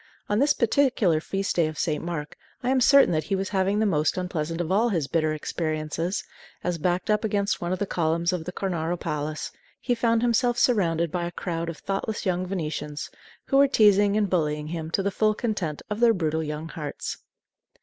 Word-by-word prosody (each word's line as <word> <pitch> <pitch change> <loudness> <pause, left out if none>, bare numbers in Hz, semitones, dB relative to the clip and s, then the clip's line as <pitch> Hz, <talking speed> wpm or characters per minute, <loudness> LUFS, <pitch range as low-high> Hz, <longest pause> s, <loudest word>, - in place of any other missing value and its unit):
On 205 +1 +2
this 290 +2 +3
particular 230 - +2
Feast 195 +3 -2
Day 165 -2 +4
of 155 -1 -6
St. 155 -3 -1
Mark, 165 -3 -4 0.3
I 250 - +1
am 265 -1 +3
certain 275 -1 +6
that 155 -2 0
he 195 - 0
was 195 0 -2
having 195 +1 +1
the 220 - +2
most 155 -5 +1
unpleasant 165 -3 -3
of 175 0 -2
all 220 +5 +3
his 165 -9 0
bitter 155 0 +1
experiences, 155 +3 -2 0.4
as, 175 -2 -1
backed 180 +5 0
up 210 - +2
against 205 -2 0
one 175 0 -2
of 185 - 0
the 205 - -1
columns 170 0 0
of 170 -3 -3
the 180 - -4
Cornaro 175 -2 -2
Palace, 150 +1 -3 0.3
he 245 - 0
found 230 -1 +1
himself 240 0 +2
surrounded 170 -10 +2
by 175 0 -1
a - - -6
crowd 170 -1 -3
of 165 - -6
thoughtless 200 +3 -3
young 185 -1 0
Venetians, 155 -5 -4 0.3
who 275 - +2
were 280 0 +7
teasing 205 -4 +4
and 210 -1 +2
bullying 150 -4 -1
him 160 -1 -4
to 195 +4 0
the 200 - 0
full 215 +1 +2
content 205 -10 -3
of 210 +1 -4
their 235 -1 +5
brutal 160 -3 0
young 155 +1 -5
hearts. 150 -4 -5
180 Hz, 205 wpm, -25 LUFS, 160-210 Hz, 0.4 s, were